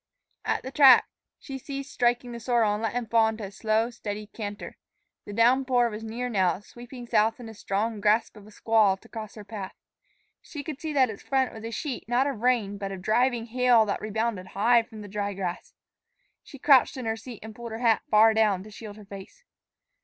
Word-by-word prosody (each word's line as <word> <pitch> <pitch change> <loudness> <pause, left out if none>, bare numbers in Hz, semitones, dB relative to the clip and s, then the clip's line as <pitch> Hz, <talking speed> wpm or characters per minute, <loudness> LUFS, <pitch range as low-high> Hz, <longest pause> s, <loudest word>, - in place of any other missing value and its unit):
At - - -1
the 260 - -6
track 270 -3 +7 0.3
she 270 -2 -8
ceased 275 +1 -7
striking 245 0 +1
the 235 - -6
sorrel 230 -3 +2
and 210 - -3
let 225 -2 -1
him 245 -1 -2
fall 225 0 +3
into 220 0 -4
a 195 - -6
slow, 220 +3 0
steady 210 -2 -6
canter. 205 -1 -7 0.5
The 205 - -8
downpour 245 +1 +3
was 215 +1 -7
near 235 +3 -4
now, 190 -7 +1
sweeping 245 +3 -11
south 225 0 +2
in 245 - -9
the 225 - -9
strong 210 +1 -2
grasp 215 +3 +2
of 210 -1 -14
a - - -13
squall 215 -2 +2
to - - -19
cross 220 -3 -8
her 210 - -9
path. 200 -2 -7 0.7
She 290 -3 -8
could 300 -3 -7
see 315 - -3
that 265 -5 +3
its 200 - -10
front 265 -1 0
was 220 - -10
a 225 - -4
sheet 250 +3 -5
not 245 +2 +2
of 275 -6 -3
rain, 225 -5 +1
but 195 -1 -4
of 190 -1 -7
driving 240 +2 +1
hail 240 -1 +4
that 200 - -3
rebounded 215 -3 -2
high 235 +3 +5
from 220 -1 -11
the - - -9
dry 200 0 -3
grass. 185 -2 -5 0.7
She 275 - -13
crouched 275 0 +4
in 255 - -5
her 225 0 0
seat 230 0 -10
and 220 0 -9
pulled 235 +1 -8
her 220 - -4
hat 230 -2 +2
far 220 +1 +6
down 210 -4 +2
to 215 - -13
shield 210 -1 -10
her 210 - -13
face. 200 - -11
225 Hz, 220 wpm, -26 LUFS, 210-245 Hz, 0.7 s, track